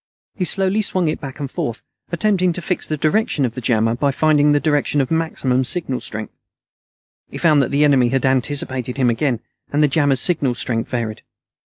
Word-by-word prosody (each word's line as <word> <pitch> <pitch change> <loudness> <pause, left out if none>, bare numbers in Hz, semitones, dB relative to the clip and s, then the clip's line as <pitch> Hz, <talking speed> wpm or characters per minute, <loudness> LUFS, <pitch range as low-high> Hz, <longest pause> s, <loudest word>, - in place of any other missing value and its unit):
He 185 - -2
slowly 195 +4 +2
swung 185 -4 0
it 155 - -3
back 135 -1 -8
and 145 - -3
forth, 115 -1 -4 0.3
attempting 185 0 +1
to 175 - -4
fix 180 - -1
the 155 - -2
direction 155 -2 +1
of 120 - -3
the 130 - -6
jammer 115 -1 +1
by 140 +4 0
finding 150 +1 +3
the 145 - +3
direction 145 -1 0
of 135 +1 -1
maximum 140 -6 0
signal 135 -2 -2
strength. 110 0 -7 1.0
He - - -8
found 155 -4 +4
that 130 - 0
the 140 +1 +2
enemy 135 -5 +4
had 135 +1 0
anticipated 130 -1 -1
him 125 -3 +2
again, 120 -1 -1 0.3
and 150 +1 +2
the - - +5
jammer's 140 -2 +2
signal 145 -9 +2
strength 115 -1 -2
varied. 115 -3 -3
140 Hz, 195 wpm, -19 LUFS, 125-160 Hz, 1.0 s, the